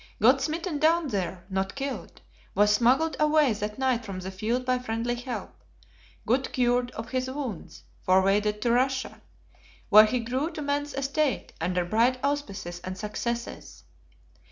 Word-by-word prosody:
Got 255 Hz, +5 st, +5 dB
smitten 320 Hz, +2 st, -2 dB
down 320 Hz, 0 st, +3 dB
there, 185 Hz, -4 st, -3 dB
not 190 Hz, 0 st, -2 dB
killed; 275 Hz, 0 st, -5 dB, 0.3 s
was 210 Hz, +1 st, +4 dB
smuggled 255 Hz, +9 st, +3 dB
away 305 Hz, -4 st, +4 dB
that 210 Hz, 0 st, -4 dB
night 260 Hz, -3 st, +1 dB
from 195 Hz, -4 st, -6 dB
the 185 Hz, +1 st, -6 dB
field 230 Hz, +6 st, -2 dB
by 255 Hz, 0 st, +1 dB
friendly 235 Hz, 0 st, -2 dB
help; 245 Hz, +1 st, -5 dB, 0.7 s
got 260 Hz, +3 st, +1 dB
cured 245 Hz, 0 st, +1 dB
of 225 Hz, 0 st, -7 dB
his 255 Hz, 0 st, -1 dB
wounds, 260 Hz, -, -6 dB, 0.2 s
forwarded 200 Hz, +3 st, +2 dB
to 235 Hz, -, +2 dB
Russia, 260 Hz, +2 st, 0 dB, 0.7 s
where 215 Hz, +1 st, +9 dB
he 245 Hz, +3 st, 0 dB
grew 255 Hz, +7 st, -2 dB
to 310 Hz, -, -5 dB
man's 285 Hz, +1 st, -2 dB
estate, 275 Hz, 0 st, -1 dB
under 180 Hz, -1 st, 0 dB
bright 230 Hz, +7 st, +2 dB
auspices 200 Hz, -12 st, -3 dB
and 185 Hz, +1 st, -6 dB
successes. 235 Hz, +3 st, -5 dB
245 Hz, 150 wpm, -27 LUFS, 210-275 Hz, 0.7 s, where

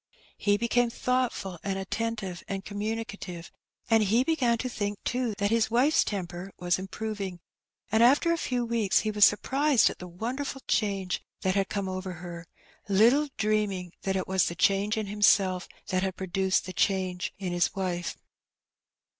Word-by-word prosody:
He 205 Hz, 0 st, +3 dB
became 235 Hz, +2 st, +2 dB
thoughtful 240 Hz, -8 st, -1 dB
and 195 Hz, -1 st, -2 dB
attentive 195 Hz, -2 st, -3 dB
and 195 Hz, -1 st, -4 dB
communicative, 205 Hz, -4 st, -5 dB, 0.4 s
and 225 Hz, -1 st, +4 dB
he 220 Hz, +4 st, +3 dB
began 260 Hz, -6 st, +2 dB
to 255 Hz, -, -3 dB
think, 205 Hz, -4 st, -3 dB
too, 245 Hz, -3 st, -1 dB
that 200 Hz, +1 st, 0 dB
his 230 Hz, -1 st, +2 dB
wife's 255 Hz, +7 st, +4 dB
temper 185 Hz, -1 st, -5 dB
was 175 Hz, 0 st, 0 dB
improving; 195 Hz, -1 st, -5 dB, 0.5 s
and 220 Hz, +1 st, +3 dB
after 285 Hz, +8 st, +5 dB
a -, -, 0 dB
few 245 Hz, -4 st, -1 dB
weeks 230 Hz, -4 st, +2 dB
he 215 Hz, -, -1 dB
was 210 Hz, -1 st, +7 dB
surprised 270 Hz, +4 st, +3 dB
at -, -, -11 dB
the 180 Hz, -, -7 dB
wonderful 255 Hz, +9 st, -4 dB
change 195 Hz, -4 st, 0 dB, 0.2 s
that 190 Hz, -, +1 dB
had 195 Hz, 0 st, 0 dB
come 200 Hz, -2 st, -2 dB
over 185 Hz, 0 st, -4 dB
her, 170 Hz, -1 st, -8 dB, 0.4 s
little 240 Hz, +9 st, +4 dB
dreaming 210 Hz, -4 st, 0 dB
that 195 Hz, 0 st, -1 dB
it 190 Hz, -, -1 dB
was 190 Hz, -2 st, +2 dB
the 170 Hz, -, -3 dB
change 200 Hz, +3 st, +2 dB
in 215 Hz, -, -1 dB
himself 195 Hz, -2 st, +3 dB, 0.2 s
that 185 Hz, 0 st, +1 dB
had 190 Hz, -1 st, -2 dB
produced 190 Hz, 0 st, 0 dB
the 185 Hz, -, -6 dB
change 185 Hz, -2 st, 0 dB
in 190 Hz, -3 st, -4 dB
his 175 Hz, +3 st, +1 dB
wife. 180 Hz, -2 st, -2 dB
205 Hz, 165 wpm, -28 LUFS, 185-230 Hz, 0.5 s, was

